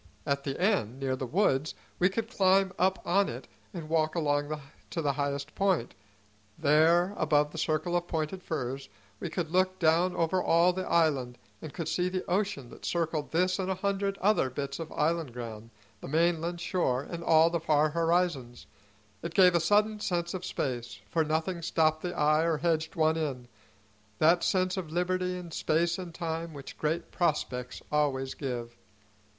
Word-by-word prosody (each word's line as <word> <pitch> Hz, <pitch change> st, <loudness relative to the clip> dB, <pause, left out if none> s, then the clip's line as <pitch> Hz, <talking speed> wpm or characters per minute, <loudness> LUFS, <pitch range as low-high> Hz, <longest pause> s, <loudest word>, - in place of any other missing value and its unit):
At 140 Hz, -1 st, 0 dB
the 135 Hz, -1 st, -3 dB
end, 175 Hz, -, +1 dB
near 135 Hz, -1 st, -1 dB
the 130 Hz, 0 st, -4 dB
woods, 155 Hz, -, +1 dB, 0.2 s
we 180 Hz, -, +4 dB
could 225 Hz, +3 st, -3 dB
climb 195 Hz, -3 st, +3 dB
up 190 Hz, +1 st, +1 dB
on 195 Hz, +3 st, +2 dB
it 125 Hz, +2 st, -7 dB, 0.2 s
and 165 Hz, -3 st, -7 dB
walk 155 Hz, 0 st, +1 dB
along 145 Hz, -1 st, 0 dB, 0.3 s
to -, -, -4 dB
the 145 Hz, -3 st, +1 dB
highest 140 Hz, +1 st, -3 dB
point; 190 Hz, -11 st, +1 dB, 0.6 s
there 160 Hz, +5 st, +4 dB
above 150 Hz, -1 st, +2 dB
the 160 Hz, -, -6 dB
circle 160 Hz, +3 st, 0 dB
of 175 Hz, 0 st, 0 dB
pointed 160 Hz, +3 st, -3 dB
firs 135 Hz, -5 st, -4 dB, 0.3 s
we 175 Hz, -, -4 dB
could 165 Hz, -1 st, -3 dB
look 185 Hz, +1 st, +2 dB
down 170 Hz, +2 st, +3 dB
over 170 Hz, +3 st, +1 dB
all 170 Hz, +2 st, +4 dB
the 185 Hz, 0 st, -4 dB
island, 140 Hz, -7 st, +2 dB, 0.2 s
and 155 Hz, -, -7 dB
could 165 Hz, 0 st, -5 dB
see 180 Hz, 0 st, 0 dB
the 185 Hz, 0 st, -3 dB
ocean 180 Hz, -, -1 dB
that -, -, -13 dB
circled 160 Hz, -3 st, -1 dB
this 180 Hz, +3 st, +1 dB
and 190 Hz, 0 st, -1 dB
a 190 Hz, -, 0 dB
hundred 195 Hz, +1 st, -1 dB
other 200 Hz, -9 st, +2 dB
bits 140 Hz, +4 st, -4 dB
of 165 Hz, -1 st, -6 dB
island 160 Hz, -4 st, 0 dB
ground, 115 Hz, -2 st, -7 dB, 0.3 s
the -, -, -8 dB
mainland 170 Hz, +3 st, +1 dB
shore 170 Hz, -8 st, 0 dB
and 170 Hz, +2 st, -7 dB
all 165 Hz, 0 st, +5 dB
the 170 Hz, -, 0 dB
far 155 Hz, -1 st, +2 dB
horizons. 165 Hz, -7 st, 0 dB, 0.6 s
It 170 Hz, 0 st, -6 dB
gave 180 Hz, -2 st, +7 dB
a 170 Hz, -, +4 dB
sudden 210 Hz, +5 st, +2 dB
sense 175 Hz, -4 st, -1 dB
of 185 Hz, -1 st, -5 dB
space, 120 Hz, -8 st, -3 dB
for 165 Hz, -, +2 dB
nothing 160 Hz, +3 st, -1 dB
stopped 155 Hz, -1 st, +1 dB
the 175 Hz, -1 st, -4 dB
eye 155 Hz, +1 st, +3 dB
or 165 Hz, -1 st, +1 dB
hedged 160 Hz, 0 st, 0 dB
one 160 Hz, 0 st, +2 dB
in, 135 Hz, -6 st, -3 dB, 0.7 s
that 170 Hz, +6 st, +4 dB
sense 185 Hz, 0 st, +1 dB
of 175 Hz, -4 st, -4 dB
liberty 180 Hz, +1 st, 0 dB
in 175 Hz, -2 st, -8 dB
space 170 Hz, +3 st, 0 dB
and 180 Hz, -2 st, -6 dB
time 165 Hz, -1 st, -4 dB
which 140 Hz, -1 st, -9 dB
great 160 Hz, +3 st, -2 dB
prospects 125 Hz, -7 st, -1 dB
always 135 Hz, -3 st, 0 dB
give. 120 Hz, -4 st, -5 dB
165 Hz, 180 wpm, -29 LUFS, 145-180 Hz, 0.7 s, gave